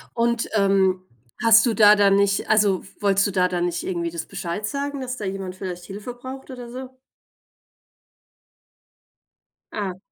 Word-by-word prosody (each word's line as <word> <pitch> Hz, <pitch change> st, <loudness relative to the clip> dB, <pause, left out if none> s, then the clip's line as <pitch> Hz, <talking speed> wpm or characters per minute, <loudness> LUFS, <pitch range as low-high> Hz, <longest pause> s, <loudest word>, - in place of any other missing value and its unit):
Und, 235 Hz, 0 st, 0 dB
ähm, 195 Hz, -2 st, +2 dB, 0.4 s
hast 225 Hz, -1 st, +7 dB
du 230 Hz, -, +1 dB
da 210 Hz, -1 st, +7 dB
dann 200 Hz, -1 st, +4 dB
nicht 200 Hz, 0 st, +1 dB
also, 205 Hz, -3 st, +3 dB, 0.2 s
wolltest 195 Hz, -1 st, +2 dB
du -, -, -2 dB
da 180 Hz, -1 st, +2 dB
dann 175 Hz, -1 st, -1 dB
nicht 175 Hz, 0 st, -3 dB
irgendwie 170 Hz, -2 st, -2 dB
das 170 Hz, -1 st, -6 dB
Bescheid 175 Hz, +5 st, -4 dB
sagen, 280 Hz, +2 st, -3 dB
dass 255 Hz, -1 st, -4 dB
da 215 Hz, -, -6 dB
jemand 190 Hz, -1 st, -4 dB
vielleicht 180 Hz, -2 st, -6 dB
Hilfe 205 Hz, +6 st, -8 dB
braucht 260 Hz, +2 st, -9 dB
oder 250 Hz, -2 st, -8 dB
so? 255 Hz, +1 st, -8 dB, 2.8 s
Ah. 190 Hz, -4 st, -4 dB
200 Hz, 155 wpm, -23 LUFS, 185-235 Hz, 2.8 s, hast